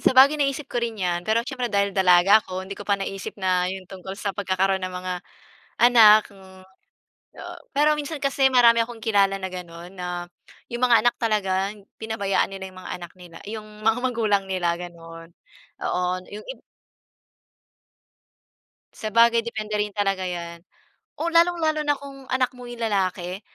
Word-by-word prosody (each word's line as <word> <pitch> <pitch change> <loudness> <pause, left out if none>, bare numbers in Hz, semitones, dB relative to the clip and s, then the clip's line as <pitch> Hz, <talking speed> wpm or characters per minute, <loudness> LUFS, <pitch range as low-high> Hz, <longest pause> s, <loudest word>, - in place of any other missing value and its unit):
sabagay 275 +3 +5
naisip 275 +1 0
ko 240 - -3
rin 230 -2 -3
'yan. 175 -3 -1
Pero 230 +2 +2
siyempre, 255 -3 -3
dahil 200 -1 +1
dalaga 190 +2 +5
ako, 185 -1 -6
hindi 195 - -8
ko 205 +1 -10
pa 200 - +3
naisip 195 +1 -6
na 185 -2 +1
yung 190 0 -6
tungkol 190 +1 -9
sa 200 -1 -3
pagkakaroon 190 -1 0
ng 185 - -3
mga 185 0 -4 0.7
anak, 225 -3 +8
hmm. 190 -1 -16 0.7
O, - - -8 0.2
pero 300 +1 +3
minsan 295 +1 -4
kasi 275 -1 +2
marami 235 -2 +6
akong 230 -2 -11
kilala 200 -3 +3
na 190 - -3
gano'n, 175 -1 -9
na 180 -1 -4 0.5
'yung 240 - -3
mga 230 -3 +5
anak 240 - +4
talaga, 200 -3 0 0.3
pinabayaan 220 -3 0
nila 190 -1 -7
yung 185 - -14
mga - - -7
anak 175 -1 -10
nila, 175 -2 -12
'yung 215 0 -6 0.2
mga 225 +2 +3
magulang 215 -5 +1
nila, 175 -2 0
gano'n. 165 -1 -10 0.5
Oo, 180 - -1 0.3
yung 210 +1 -9
ib - - -8 2.3
Sabagay, 230 +2 +3
depende 215 -2 -5
rin 210 0 0
talaga 195 -2 -1
'yan. 170 -2 -5 0.5
O, 330 +2 -2
lalong 340 0 +3
lalo 310 -1 +1
na 290 - +3
kung 275 -1 -11
anak 255 0 0
mo 250 - -10
yung 240 -1 -9
lalaki? 190 -3 -1
200 Hz, 165 wpm, -24 LUFS, 185-235 Hz, 2.3 s, anak